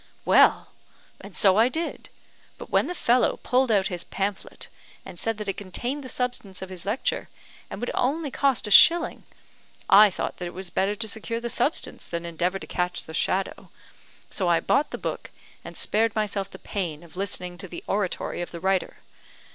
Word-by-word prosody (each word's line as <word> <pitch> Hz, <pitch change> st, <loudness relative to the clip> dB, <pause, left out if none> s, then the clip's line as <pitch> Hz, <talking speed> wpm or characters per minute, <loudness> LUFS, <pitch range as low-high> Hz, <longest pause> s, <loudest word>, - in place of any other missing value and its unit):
"Well, -, -, +5 dB, 0.5 s
and -, -, -11 dB
so 195 Hz, -2 st, +5 dB
I 230 Hz, +3 st, +5 dB
did; 325 Hz, +5 st, -4 dB, 0.5 s
but -, -, -10 dB
when -, -, +3 dB
the 360 Hz, -, -4 dB
fellow 245 Hz, -4 st, +2 dB
pulled 255 Hz, 0 st, +2 dB
out 200 Hz, -3 st, +3 dB
his 180 Hz, -2 st, -3 dB
pamphlet, 195 Hz, 0 st, -4 dB, 0.4 s
and 175 Hz, -, -9 dB
said 225 Hz, -1 st, -1 dB
that 210 Hz, -1 st, -6 dB
it 195 Hz, -, -2 dB
contained 245 Hz, +9 st, -4 dB
the 260 Hz, -, -7 dB
substance 245 Hz, -8 st, -2 dB
of 190 Hz, -, -8 dB
his 185 Hz, 0 st, -7 dB
lecture, 220 Hz, +6 st, -1 dB, 0.4 s
and -, -, -7 dB
would 245 Hz, -, -2 dB
only 285 Hz, +3 st, 0 dB
cost 270 Hz, -2 st, +1 dB
a 210 Hz, -, -4 dB
shilling, 335 Hz, +10 st, +6 dB, 0.6 s
I 210 Hz, +2 st, +8 dB
thought 185 Hz, -, -4 dB
that 180 Hz, -, -4 dB
it 175 Hz, -, -9 dB
was 185 Hz, -1 st, -6 dB
better 195 Hz, +2 st, +1 dB
to 220 Hz, +1 st, -3 dB
secure 225 Hz, +2 st, -3 dB
the 235 Hz, 0 st, -4 dB
substance 245 Hz, +7 st, -1 dB
than 170 Hz, 0 st, -4 dB
endeavour 175 Hz, +3 st, -1 dB
to -, -, -9 dB
catch 180 Hz, 0 st, -2 dB
the 160 Hz, -, -10 dB
shadow 190 Hz, +3 st, -1 dB, 0.6 s
so 185 Hz, -, -1 dB
I 170 Hz, -1 st, +4 dB
bought 280 Hz, -, +1 dB
the -, -, -5 dB
book, -, -, -5 dB, 0.3 s
and -, -, -9 dB
spared 220 Hz, +1 st, +1 dB
myself 205 Hz, -3 st, -1 dB
the -, -, -11 dB
pain 175 Hz, -6 st, -4 dB
of 170 Hz, -1 st, -16 dB
listening 180 Hz, -2 st, -3 dB
to 190 Hz, -, -4 dB
the 175 Hz, -, -8 dB
oratory 195 Hz, -3 st, -2 dB
of 175 Hz, -, -4 dB
the 170 Hz, -, -8 dB
writer. 190 Hz, +1 st, -1 dB
200 Hz, 195 wpm, -25 LUFS, 180-235 Hz, 0.6 s, I